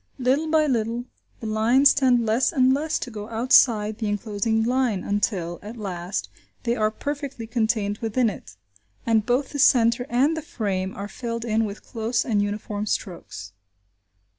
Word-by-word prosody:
Little 265 Hz, +5 st, +1 dB
by 310 Hz, -1 st, +3 dB
little, 235 Hz, -2 st, -1 dB, 0.4 s
the -, -, -6 dB
lines 230 Hz, +6 st, +4 dB
tend 250 Hz, -4 st, +3 dB
less 225 Hz, +4 st, +2 dB
and 260 Hz, -4 st, +4 dB
less 305 Hz, +3 st, 0 dB
to 250 Hz, -, -6 dB
go 210 Hz, -1 st, -7 dB
outside 225 Hz, -2 st, +3 dB
the 220 Hz, -, -2 dB
enclosing 210 Hz, +2 st, -1 dB
line 245 Hz, -4 st, 0 dB
until, 195 Hz, -4 st, -1 dB
at 215 Hz, +4 st, -9 dB
last, 185 Hz, -3 st, -4 dB, 0.4 s
they 235 Hz, 0 st, 0 dB
are 215 Hz, -2 st, +1 dB
perfectly 280 Hz, 0 st, -5 dB
contained 220 Hz, -2 st, -1 dB
within 230 Hz, +2 st, +1 dB
it, 150 Hz, -, -6 dB, 0.5 s
and 220 Hz, -2 st, +2 dB
both 255 Hz, +3 st, +1 dB
the 285 Hz, -, -5 dB
centre 240 Hz, -1 st, +4 dB
and 270 Hz, +7 st, +2 dB
the 320 Hz, -, -4 dB
frame 195 Hz, -9 st, -3 dB
are 200 Hz, +1 st, -5 dB
filled 230 Hz, +3 st, -5 dB
in 225 Hz, 0 st, +1 dB
with 205 Hz, 0 st, -7 dB
close 225 Hz, 0 st, -1 dB
and 210 Hz, -4 st, +1 dB
uniform 205 Hz, 0 st, -3 dB
strokes. 100 Hz, -, -5 dB
225 Hz, 165 wpm, -24 LUFS, 210-250 Hz, 0.5 s, lines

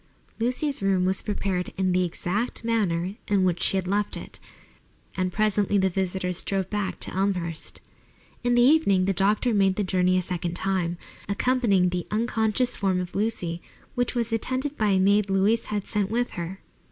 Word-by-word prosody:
Lucy's 255 Hz, +4 st, +1 dB
room 190 Hz, -2 st, +2 dB
was 190 Hz, +1 st, +2 dB
prepared 190 Hz, -3 st, -2 dB
in 185 Hz, -1 st, +1 dB
the 180 Hz, 0 st, +2 dB
exact 185 Hz, +8 st, -2 dB
manner 200 Hz, -4 st, 0 dB
in 200 Hz, -2 st, +2 dB
which 180 Hz, -1 st, +1 dB
she 195 Hz, -, +4 dB
had 185 Hz, -1 st, -2 dB
left 205 Hz, +2 st, 0 dB
it, -, -, -10 dB, 0.8 s
and 185 Hz, -1 st, -1 dB
presently 205 Hz, 0 st, +1 dB
the 190 Hz, -1 st, +2 dB
visitors 185 Hz, -1 st, -2 dB
drove 195 Hz, -2 st, -1 dB
back 205 Hz, -2 st, -2 dB
to -, -, -4 dB
Elmhurst. 180 Hz, -4 st, -2 dB, 0.6 s
In 245 Hz, 0 st, +2 dB
the 240 Hz, -, +5 dB
evening 245 Hz, -10 st, +4 dB
the 195 Hz, -, +1 dB
doctor 205 Hz, +6 st, +2 dB
made 195 Hz, -2 st, +3 dB
the 210 Hz, -, 0 dB
journey 185 Hz, -1 st, +2 dB
a 185 Hz, -, 0 dB
second 175 Hz, -1 st, -3 dB
time, 180 Hz, -2 st, -1 dB, 0.3 s
accompanying 200 Hz, -4 st, +2 dB
the 175 Hz, 0 st, -3 dB
unconscious 225 Hz, +2 st, 0 dB
form 190 Hz, -2 st, 0 dB
of 180 Hz, -1 st, -5 dB
Lucy, 190 Hz, -6 st, -2 dB, 0.3 s
which 245 Hz, 0 st, -1 dB
was 235 Hz, -1 st, -1 dB
attended 260 Hz, +5 st, -2 dB
by 215 Hz, -, 0 dB
a 190 Hz, -1 st, +3 dB
maid 200 Hz, +1 st, +3 dB
Louise 200 Hz, +4 st, +2 dB
had 205 Hz, -2 st, -3 dB
sent 205 Hz, -2 st, -1 dB
with 240 Hz, +2 st, -1 dB
her. 175 Hz, +2 st, -6 dB
195 Hz, 175 wpm, -25 LUFS, 185-220 Hz, 0.8 s, the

